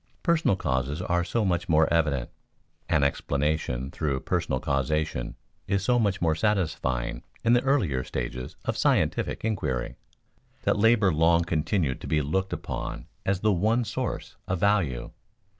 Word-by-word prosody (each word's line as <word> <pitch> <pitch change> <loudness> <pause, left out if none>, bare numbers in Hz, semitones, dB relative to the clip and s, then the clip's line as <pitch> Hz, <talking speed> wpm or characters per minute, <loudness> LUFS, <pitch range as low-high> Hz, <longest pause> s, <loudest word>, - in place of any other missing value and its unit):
Personal 170 - +3
causes 65 -2 -1
are 90 -1 0
so 110 +4 0
much 90 -1 0
more 80 0 +5
evident, 75 -7 +1 0.6
an 80 -3 +3
explanation 70 -2 -1
through 70 -4 -1
personal - - -1
causation 70 -1 -1 0.3
is 100 -1 0
so 120 +4 +3
much 100 -4 +1
more 80 -2 +2
satisfying 80 - -1 0.2
in 115 - +4
the 120 - +5
earlier 100 - +1
stages 65 0 -5
of - - -1
scientific - - +1
inquiry, 70 - -2 0.7
that - - +2
labor 110 -4 +4
long 85 +2 +4
continued 80 -3 0
to - - -6
be 75 -2 +1
looked 95 +7 -1
upon - - -5 0.2
as 95 -1 +1
the 105 -1 +3
one 110 +7 +2
source - - -4
of 90 -1 -1
value. 95 -12 +1
85 Hz, 145 wpm, -27 LUFS, 70-100 Hz, 0.7 s, more